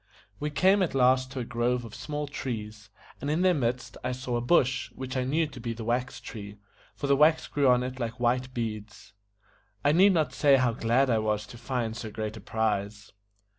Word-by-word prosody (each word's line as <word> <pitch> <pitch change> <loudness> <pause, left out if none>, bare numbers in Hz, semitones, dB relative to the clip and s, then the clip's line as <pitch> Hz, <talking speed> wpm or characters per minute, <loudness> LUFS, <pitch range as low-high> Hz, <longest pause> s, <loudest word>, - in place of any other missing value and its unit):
We 150 - -2
came 190 +6 +3
at 175 -6 0
last 130 0 +3
to 130 - -3
a - - -4
grove 120 +1 -1
of 115 - -10
small 150 -1 -4
trees, 110 -7 -6 0.3
and 145 - -2
in 155 +4 +1
their 185 -1 +5
midst 125 -4 -2
I 125 0 -1
saw 125 -1 -3
a 120 - 0
bush, 125 -1 +2
which 130 0 -6
I 130 - +1
knew 155 +5 +1
to 140 -4 -10
be 115 0 -3
the 115 0 -7
wax 125 +3 -1
tree, 105 -3 -9 0.4
for - - -5
the 140 0 +4
wax 155 +3 +4
grew 140 -2 +1
on 125 0 +4
it 130 +1 -5
like 115 0 -4
white 125 +1 +1
beads. 105 -4 -6 0.7
I 145 - +5
need 190 +5 +6
not 160 -3 +1
say 140 -2 +5
how 125 -3 +2
glad 120 +4 +2
I 115 - +3
was 105 -1 -1
to 120 - -12
find 120 -2 -2
so 115 -2 -6
great 110 0 -4
a 110 - -9
prize. 105 -1 -2
125 Hz, 215 wpm, -28 LUFS, 115-140 Hz, 0.7 s, need